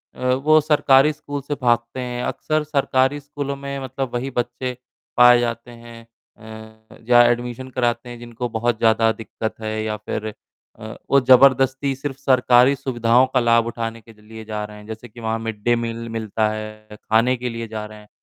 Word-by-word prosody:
अ, 125 Hz, 0 st, 0 dB
वो 155 Hz, +4 st, +4 dB
सरकारी 145 Hz, -1 st, +4 dB
स्कूल 145 Hz, -1 st, -7 dB
से 145 Hz, +1 st, -4 dB
भागते 120 Hz, 0 st, 0 dB
हैं, 125 Hz, -1 st, -4 dB
अक्सर 155 Hz, 0 st, -2 dB
सरकारी 140 Hz, -1 st, +1 dB
स्कूलों 145 Hz, -1 st, -5 dB
में 140 Hz, 0 st, -6 dB
मतलब 130 Hz, 0 st, -5 dB
वही 125 Hz, +2 st, -2 dB
बच्चे 125 Hz, 0 st, -3 dB, 0.4 s
पाए 125 Hz, 0 st, +7 dB
जाते 120 Hz, 0 st, -3 dB
हैं 115 Hz, -1 st, -13 dB, 0.3 s
अ, 110 Hz, 0 st, -13 dB
जा 120 Hz, 0 st, +6 dB
एडमिशन 120 Hz, +2 st, -4 dB
कराते 120 Hz, -1 st, -2 dB
हैं 120 Hz, -1 st, -9 dB
जिनको 120 Hz, 0 st, -6 dB
बहुत 115 Hz, 0 st, -1 dB
ज़्यादा 115 Hz, 0 st, +3 dB
दिक्कत 110 Hz, 0 st, -6 dB
है 110 Hz, 0 st, -3 dB
या 110 Hz, -1 st, -3 dB
फिर 110 Hz, 0 st, -5 dB, 0.5 s
अ, 110 Hz, +1 st, -8 dB
वो 140 Hz, -, +5 dB
ज़बरदस्ती 130 Hz, +1 st, +4 dB
सिर्फ़ 135 Hz, 0 st, -6 dB
सरकारी 130 Hz, 0 st, +4 dB
सुविधाओं 120 Hz, -1 st, +2 dB
का 130 Hz, -, +4 dB
लाभ 115 Hz, -1 st, +3 dB
उठाने 115 Hz, -1 st, -5 dB
के 115 Hz, 0 st, -17 dB
ज 105 Hz, -, -26 dB
लिए 110 Hz, +1 st, -12 dB
जा 105 Hz, -1 st, -4 dB
रहे 105 Hz, 0 st, -11 dB
हैं, 105 Hz, -, -13 dB
जैसे 110 Hz, +2 st, -8 dB
कि 120 Hz, -, -14 dB
वहाँ 110 Hz, 0 st, -2 dB
मिड-डे 115 Hz, +1 st, -1 dB
मील 115 Hz, 0 st, -4 dB
मिलता 110 Hz, -1 st, -1 dB
है, 110 Hz, 0 st, -8 dB
खाने 115 Hz, +3 st, +2 dB
के 125 Hz, +1 st, -4 dB
लिए 115 Hz, 0 st, -6 dB
जा 110 Hz, -1 st, -6 dB
रहे 105 Hz, 0 st, -12 dB
हैं। 105 Hz, -, -17 dB
120 Hz, 190 wpm, -21 LUFS, 110-130 Hz, 0.5 s, पाए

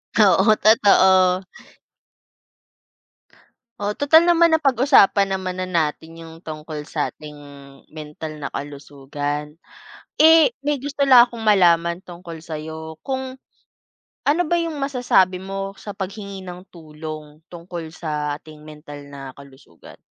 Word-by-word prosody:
Oo, 205 Hz, 0 st, +4 dB
totoo. 190 Hz, -4 st, +4 dB, 2.3 s
Oh, 205 Hz, 0 st, -2 dB
tutal 315 Hz, +6 st, +4 dB
naman 340 Hz, -1 st, +4 dB
na 320 Hz, -, +4 dB
pag-usapan 260 Hz, -8 st, +3 dB
naman 185 Hz, -1 st, -5 dB
na 185 Hz, -, -4 dB
natin 165 Hz, -1 st, -2 dB
yung 165 Hz, 0 st, -12 dB
tungkol 155 Hz, -2 st, -7 dB
sa 150 Hz, -, -3 dB
ating 150 Hz, -1 st, -12 dB, 0.6 s
mental 155 Hz, 0 st, -8 dB
na 140 Hz, -, -4 dB
kalusugan. 145 Hz, +1 st, -6 dB, 0.7 s
Eh, 320 Hz, -4 st, +6 dB
may 290 Hz, +1 st, -1 dB
gusto 280 Hz, +2 st, -8 dB
lang 250 Hz, -2 st, +8 dB
akong 240 Hz, -1 st, -10 dB
malaman 175 Hz, -4 st, +2 dB
tungkol 170 Hz, -1 st, -10 dB
sa'yo 160 Hz, 0 st, -8 dB
kung 260 Hz, +2 st, -5 dB, 0.8 s
ano 300 Hz, +5 st, +1 dB
ba 320 Hz, -, -2 dB
yung 330 Hz, -2 st, -4 dB
masasabi 245 Hz, -10 st, +1 dB
mo 195 Hz, +1 st, -5 dB
sa 200 Hz, 0 st, -10 dB
paghingi 195 Hz, 0 st, -7 dB
ng 180 Hz, 0 st, -9 dB
tulong 155 Hz, -2 st, -10 dB
tungkol 170 Hz, -1 st, -8 dB
sa 150 Hz, -3 st, -4 dB
ating 155 Hz, 0 st, -16 dB
mental 150 Hz, -2 st, -12 dB
na 135 Hz, -2 st, -10 dB
kalusugan? 135 Hz, -11 st, -17 dB
180 Hz, 120 wpm, -21 LUFS, 155-220 Hz, 2.3 s, lang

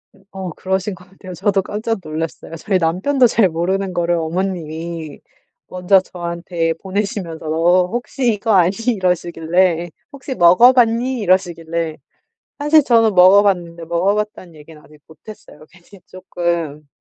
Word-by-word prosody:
음 195 Hz, -, -24 dB
어 190 Hz, -2 st, -6 dB
그러신 190 Hz, +4 st, -3 dB
것 180 Hz, -, -17 dB
같아요. 185 Hz, -1 st, -11 dB
저도 195 Hz, +2 st, 0 dB
깜짝 215 Hz, +3 st, -3 dB
놀랐어요. 160 Hz, +1 st, -6 dB
저희 190 Hz, +4 st, -1 dB
남편도 190 Hz, +11 st, +2 dB
잘 220 Hz, -4 st, +2 dB
모르는 185 Hz, +3 st, -2 dB
거를 175 Hz, 0 st, 0 dB
어머님이 165 Hz, -2 st, -4 dB, 0.5 s
먼저 185 Hz, +1 st, +2 dB
저한테 170 Hz, -2 st, -4 dB
보내시면서 190 Hz, -4 st, -4 dB, 0.5 s
"혹시 245 Hz, 0 st, -1 dB
이거 215 Hz, +2 st, -2 dB
아니?" 185 Hz, -3 st, +4 dB, 0.2 s
이러시길래 175 Hz, -1 st, 0 dB, 0.2 s
"혹시 270 Hz, -1 st, -7 dB
먹어 180 Hz, +8 st, +6 dB
봤니?" 245 Hz, +1 st, +1 dB
이러시길래 170 Hz, -4 st, -1 dB, 0.6 s
사실 295 Hz, +1 st, +4 dB
저는 225 Hz, -4 st, +3 dB
먹어 185 Hz, +3 st, +7 dB
봤는데 170 Hz, -4 st, -2 dB
먹어 170 Hz, +5 st, 0 dB
봤다는 210 Hz, -5 st, -5 dB
얘기는 150 Hz, 0 st, -15 dB
아직 150 Hz, 0 st, -19 dB
못했어요. 160 Hz, -2 st, -14 dB
괜히 185 Hz, +1 st, -19 dB
조금 170 Hz, -5 st, -4 dB
180 Hz, 320 characters per minute, -18 LUFS, 170-205 Hz, 0.6 s, 먹어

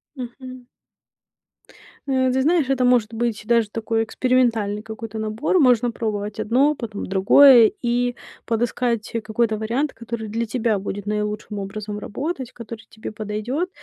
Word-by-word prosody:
Мгм. 255 Hz, 0 st, -9 dB, 1.4 s
Э, 260 Hz, -1 st, +2 dB
ты 260 Hz, +1 st, +1 dB
знаешь, 310 Hz, -1 st, +2 dB
это 260 Hz, -2 st, +2 dB
может 235 Hz, -3 st, +3 dB
быть 225 Hz, -1 st, -1 dB
даже 230 Hz, -2 st, +2 dB
такой 225 Hz, +1 st, -1 dB
экспериментальный 230 Hz, -4 st, +1 dB
какой-то 220 Hz, 0 st, -7 dB
набор. 220 Hz, -, 0 dB
Можно 245 Hz, -3 st, +4 dB
пробовать 210 Hz, -2 st, -4 dB
одно, 255 Hz, +8 st, +2 dB
потом 220 Hz, -6 st, -6 dB
другое. 225 Hz, +5 st, +7 dB
И 245 Hz, 0 st, 0 dB, 0.3 s
подыскать 235 Hz, -1 st, -1 dB
какой-то 220 Hz, 0 st, 0 dB
вариант, 240 Hz, +7 st, -1 dB
который 230 Hz, -1 st, -6 dB
для 230 Hz, +2 st, -2 dB
тебя 225 Hz, -2 st, 0 dB
будет 200 Hz, +1 st, -5 dB
наилучшим 210 Hz, 0 st, -3 dB
образом 210 Hz, +1 st, -5 dB
работать, 265 Hz, +4 st, -4 dB
который 230 Hz, -1 st, -9 dB
тебе 220 Hz, 0 st, -8 dB
подойдет. 215 Hz, -, -3 dB
230 Hz, 135 wpm, -22 LUFS, 215-250 Hz, 1.4 s, другое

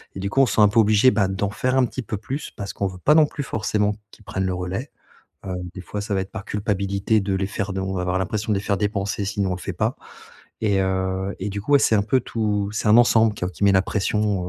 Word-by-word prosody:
et -, -, -5 dB
du 100 Hz, -, -2 dB
coup 135 Hz, -, +3 dB
on -, -, +6 dB
se -, -, -2 dB
sent 110 Hz, -, +4 dB
un 105 Hz, -, +7 dB
peu 110 Hz, -, +3 dB
obligé 110 Hz, +3 st, +5 dB
bah, 100 Hz, -2 st, +2 dB
d'en 95 Hz, +1 st, -1 dB
faire 130 Hz, +4 st, -1 dB
un 130 Hz, -, +4 dB
petit 130 Hz, -, -6 dB
peu 105 Hz, -, -4 dB
plus 130 Hz, +8 st, -5 dB
parce 100 Hz, -1 st, -6 dB
qu'on 100 Hz, -, -2 dB
veut 95 Hz, -1 st, -8 dB
pas 150 Hz, -, +4 dB
non 155 Hz, -, +7 dB
plus 145 Hz, -, -6 dB
forcément 105 Hz, -3 st, 0 dB, 0.2 s
qu'ils -, -, -18 dB
prennent 95 Hz, 0 st, -2 dB
le 95 Hz, -, -1 dB
relais. 90 Hz, +9 st, -4 dB, 0.6 s
Heu, 95 Hz, -, -3 dB, 0.2 s
des 95 Hz, -, -7 dB
fois 105 Hz, +3 st, -5 dB
ça 105 Hz, -, -5 dB
va 95 Hz, -, +1 dB
être 95 Hz, -, -9 dB
par 110 Hz, -3 st, -6 dB
culpabilité 100 Hz, +1 st, 0 dB
de 95 Hz, -1 st, -1 dB
les 95 Hz, 0 st, 0 dB
faire 100 Hz, 0 st, -3 dB
de 95 Hz, -, -3 dB
on 95 Hz, 0 st, -3 dB
va 90 Hz, -, -1 dB
avoir 90 Hz, +1 st, 0 dB
l'impression 105 Hz, +3 st, -2 dB
de 100 Hz, -, +1 dB
les -, -, -6 dB
faire 100 Hz, -, +1 dB
dépenser 100 Hz, -1 st, -1 dB
si 100 Hz, +1 st, -3 dB
nous 95 Hz, -, +1 dB
on -, -, 0 dB
le -, -, -11 dB
fait -, -, -4 dB
pas, -, -, -1 dB, 0.6 s
et 100 Hz, -3 st, +2 dB
heu, 95 Hz, +1 st, -1 dB
et 100 Hz, -, -2 dB
du 100 Hz, 0 st, -4 dB
coup 145 Hz, -, -2 dB
ouais, -, -, +8 dB
c'est -, -, +3 dB
un 100 Hz, -, +2 dB
peu 130 Hz, +5 st, +2 dB
tout 105 Hz, -4 st, -1 dB
c'est 105 Hz, 0 st, -1 dB
un 105 Hz, -, +7 dB
ensemble 115 Hz, -2 st, +5 dB
quoi, 90 Hz, -, -2 dB
qui 95 Hz, -, -11 dB
met 100 Hz, -, +6 dB
la 95 Hz, -, +5 dB
pression, 105 Hz, -2 st, -1 dB
100 Hz, 295 wpm, -23 LUFS, 95-110 Hz, 0.6 s, ouais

